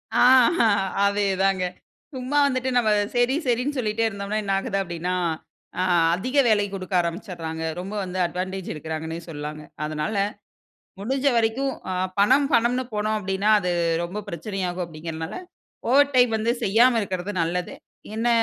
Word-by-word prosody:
ஆ -, -, +3 dB, 0.9 s
அதேதாங்க. 195 Hz, -2 st, +1 dB, 0.5 s
சும்மா 260 Hz, +3 st, -2 dB
வந்துட்டு 255 Hz, -1 st, -1 dB
நம்ம 220 Hz, -3 st, +3 dB, 0.3 s
சேரி 245 Hz, +3 st, +3 dB
சேரின்னு 250 Hz, +4 st, 0 dB
சொல்லிட்டே 225 Hz, -1 st, 0 dB
இருந்தோம்னா 200 Hz, 0 st, -3 dB
என்ன 195 Hz, -1 st, -1 dB
ஆகுது 195 Hz, -2 st, -2 dB
அப்டின்னா, 175 Hz, 0 st, -3 dB, 0.7 s
ஆ -, -, +2 dB, 0.3 s
அதிக 255 Hz, +9 st, -3 dB
வேலை 210 Hz, -2 st, +3 dB
குடுக்க 190 Hz, 0 st, -6 dB
ஆரம்பிச்சுறாங்க. 170 Hz, -2 st, -5 dB, 0.2 s
ரொம்ப 195 Hz, +3 st, -6 dB
வந்து 185 Hz, 0 st, -5 dB
அட்வான்டேஜ் 185 Hz, +1 st, -4 dB
எடுக்கிறாங்கன்னே 160 Hz, +2 st, -5 dB
சொல்லலாங்க. 150 Hz, 0 st, -6 dB, 0.2 s
அதனால, 155 Hz, +7 st, -3 dB, 0.9 s
முடிஞ்ச 265 Hz, +6 st, -1 dB
வரைக்கும் 235 Hz, +4 st, +1 dB, 0.2 s
ஆ -, -, -1 dB, 0.3 s
பணம் 265 Hz, +7 st, +5 dB
பணம்னு 245 Hz, +2 st, +2 dB
போனோம் 215 Hz, +1 st, 0 dB
அப்டின்னா 195 Hz, +1 st, 0 dB
அது 180 Hz, -1 st, -1 dB, 0.3 s
ரொம்ப 200 Hz, +5 st, -5 dB
பிரச்சனை 195 Hz, +3 st, -5 dB
ஆகும் 180 Hz, 0 st, -3 dB
அப்டிங்கிறனால, 160 Hz, 0 st, -6 dB, 0.6 s
ஓவர் 285 Hz, +1 st, +5 dB
டைம் 245 Hz, -2 st, +5 dB
வந்து 225 Hz, +2 st, +1 dB
செய்யாம 230 Hz, +4 st, +4 dB
இருக்கிறது 190 Hz, +1 st, -4 dB
நல்லது. 175 Hz, +2 st, -2 dB, 0.4 s
என்ன 225 Hz, +2 st, 0 dB
200 Hz, 135 wpm, -24 LUFS, 180-235 Hz, 0.9 s, பணம்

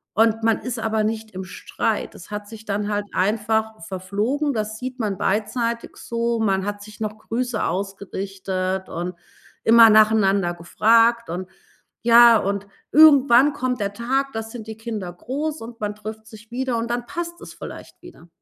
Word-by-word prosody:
und 225 Hz, +1 st, +3 dB
man 225 Hz, -1 st, +2 dB
ist 250 Hz, -1 st, -4 dB
aber 220 Hz, -1 st, 0 dB
nicht 220 Hz, 0 st, -3 dB
im 190 Hz, 0 st, -6 dB
Streit. 185 Hz, -, -3 dB
Es -, -, -12 dB
hat 210 Hz, 0 st, -5 dB
sich 220 Hz, 0 st, -11 dB
dann 205 Hz, 0 st, -2 dB
halt 205 Hz, 0 st, -1 dB
einfach 220 Hz, +2 st, 0 dB
verflogen, 210 Hz, +10 st, -1 dB
das 215 Hz, -1 st, -3 dB
sieht 255 Hz, 0 st, -6 dB
man 205 Hz, -4 st, -1 dB
beidseitig 230 Hz, +4 st, -1 dB
so. 235 Hz, 0 st, -2 dB
Man 195 Hz, -3 st, +1 dB
hat 205 Hz, 0 st, -4 dB
sich 210 Hz, 0 st, -13 dB
noch 215 Hz, 0 st, -3 dB
Grüße 235 Hz, +1 st, -2 dB
ausgerichtet 190 Hz, -1 st, -3 dB
und 175 Hz, +2 st, -4 dB, 0.5 s
immer 230 Hz, 0 st, +8 dB
nacheinander 205 Hz, -4 st, +4 dB
gefragt 230 Hz, +6 st, +3 dB
und 185 Hz, +2 st, -5 dB, 0.5 s
ja, 235 Hz, -1 st, +8 dB
und 200 Hz, 0 st, -2 dB, 0.3 s
irgendwann 285 Hz, -3 st, +7 dB
kommt 255 Hz, -3 st, -2 dB
der 200 Hz, -1 st, -1 dB
Tag, 270 Hz, +5 st, -1 dB
da 225 Hz, -, -3 dB
sind 225 Hz, 0 st, -9 dB
die 220 Hz, -, -6 dB
Kinder 215 Hz, -6 st, -5 dB
groß 290 Hz, -, -4 dB
und 230 Hz, 0 st, -10 dB
man 210 Hz, -1 st, -2 dB
trifft 215 Hz, +1 st, -8 dB
sich 220 Hz, +1 st, -14 dB
wieder, 255 Hz, 0 st, -2 dB
und 230 Hz, +1 st, -3 dB
dann 240 Hz, 0 st, -2 dB
passt 345 Hz, +3 st, -5 dB
es -, -, -10 dB
vielleicht -, -, -10 dB
wieder. 350 Hz, -, -14 dB
220 Hz, 170 wpm, -22 LUFS, 200-235 Hz, 0.5 s, immer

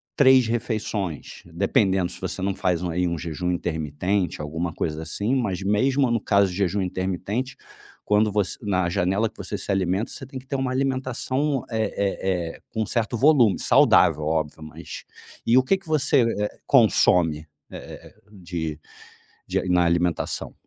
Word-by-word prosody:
3 130 Hz, -3 st, +6 dB
refeições, 110 Hz, -, -3 dB
dependendo 95 Hz, +1 st, +1 dB
se -, -, -11 dB
você -, -, -2 dB
não 100 Hz, +1 st, 0 dB
faz 90 Hz, -3 st, 0 dB
um 90 Hz, -, -2 dB
aí 90 Hz, +2 st, 0 dB
um 85 Hz, -1 st, -2 dB
jejum 85 Hz, +2 st, -3 dB
intermitente, 85 Hz, +2 st, -2 dB
alguma 80 Hz, +3 st, -3 dB
coisa 80 Hz, -1 st, -3 dB
assim, 100 Hz, +9 st, -2 dB
mas, 105 Hz, -8 st, -1 dB
mesmo 130 Hz, +6 st, +2 dB
no 115 Hz, -2 st, +1 dB
caso 100 Hz, -3 st, +2 dB
de 90 Hz, -, -6 dB
jejum 100 Hz, 0 st, 0 dB
intermitente, 95 Hz, +7 st, -3 dB, 0.5 s
quando 105 Hz, +1 st, +3 dB
voc 105 Hz, -1 st, +1 dB, 0.2 s
na 95 Hz, -4 st, 0 dB
janela 95 Hz, +4 st, +1 dB
que -, -, -31 dB
você 105 Hz, -, -5 dB
se 100 Hz, -, -4 dB
alimenta, 95 Hz, +3 st, 0 dB
você -, -, -8 dB
tem 135 Hz, -1 st, -7 dB
que 130 Hz, -, -17 dB
ter 140 Hz, -, -3 dB
uma 135 Hz, -1 st, -1 dB
alimentação, 130 Hz, +1 st, -1 dB
eh 110 Hz, -2 st, -1 dB
eh 95 Hz, -4 st, -1 dB
eh, -, -, -28 dB
com 110 Hz, -, -1 dB
um -, -, -3 dB
certo 120 Hz, 0 st, -1 dB
volume, 125 Hz, -, +4 dB
saudável, 75 Hz, -, +4 dB
óbvio. 80 Hz, 0 st, -2 dB
Mas 75 Hz, -, -9 dB, 0.4 s
e 120 Hz, -, +5 dB
o 130 Hz, -, +5 dB
que 190 Hz, +9 st, +2 dB
que 190 Hz, -, -20 dB
você, 145 Hz, -3 st, +3 dB, 0.2 s
eh, 105 Hz, 0 st, -3 dB
consome, 85 Hz, -, +3 dB, 0.2 s
eh-eh, -, -, -10 dB, 0.2 s
de 85 Hz, -6 st, -5 dB, 0.7 s
de -, -, -1 dB
na 90 Hz, -1 st, +3 dB
alimentação? 85 Hz, 0 st, 0 dB
100 Hz, 170 wpm, -24 LUFS, 85-120 Hz, 0.7 s, 3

